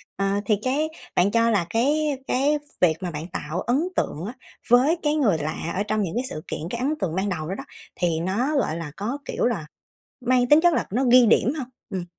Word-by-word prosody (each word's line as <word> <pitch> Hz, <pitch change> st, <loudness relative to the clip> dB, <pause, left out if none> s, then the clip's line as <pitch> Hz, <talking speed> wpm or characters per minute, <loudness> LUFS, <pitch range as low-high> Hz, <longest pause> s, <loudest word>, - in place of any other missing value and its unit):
Ờ, 195 Hz, -, -1 dB, 0.2 s
thì 215 Hz, -, +3 dB
cái 290 Hz, +5 st, 0 dB, 0.3 s
bạn 185 Hz, +3 st, +3 dB
cho 230 Hz, +1 st, +3 dB
là 200 Hz, -6 st, +2 dB
cái 285 Hz, -, +1 dB
cái 285 Hz, +4 st, +2 dB, 0.2 s
việc 170 Hz, -3 st, +4 dB
mà 180 Hz, -2 st, -3 dB
bạn 155 Hz, +1 st, -5 dB
tạo 175 Hz, -1 st, -4 dB
ấn 250 Hz, +8 st, +1 dB
tượng 160 Hz, +4 st, -2 dB
á, 225 Hz, -, -5 dB, 0.4 s
với 260 Hz, +8 st, +5 dB
cái 295 Hz, 0 st, +2 dB
người 230 Hz, -, +3 dB
lạ 155 Hz, +2 st, -3 dB
ở 200 Hz, -, 0 dB
trong 215 Hz, 0 st, -1 dB
những 190 Hz, -1 st, -3 dB
cái 245 Hz, -, 0 dB
sự 155 Hz, -, -6 dB
kiện, -, -, -4 dB
cái 235 Hz, -, -4 dB
ấn 280 Hz, +4 st, +1 dB
tượng 170 Hz, -3 st, -2 dB
ban 190 Hz, +2 st, 0 dB
đầu 160 Hz, -5 st, -3 dB
đó 190 Hz, -, -2 dB
đó -, -, -6 dB, 0.3 s
thì 170 Hz, -2 st, 0 dB
nó, 215 Hz, -, 0 dB
gọi 185 Hz, -, 0 dB
là, 165 Hz, -3 st, -6 dB
có, 230 Hz, +7 st, -3 dB
kiểu -, -, -1 dB
là, 215 Hz, -10 st, -1 dB, 0.6 s
mang 250 Hz, 0 st, +2 dB
tính 295 Hz, +3 st, +7 dB
chất 345 Hz, 0 st, +4 dB
là -, -, 0 dB
nó 250 Hz, +5 st, +1 dB
ghi 250 Hz, -1 st, +7 dB
điểm 235 Hz, +3 st, +4 dB
hông? 255 Hz, -4 st, -4 dB, 0.2 s
Ừm. 185 Hz, -2 st, -3 dB
225 Hz, 235 wpm, -24 LUFS, 180-260 Hz, 0.6 s, tính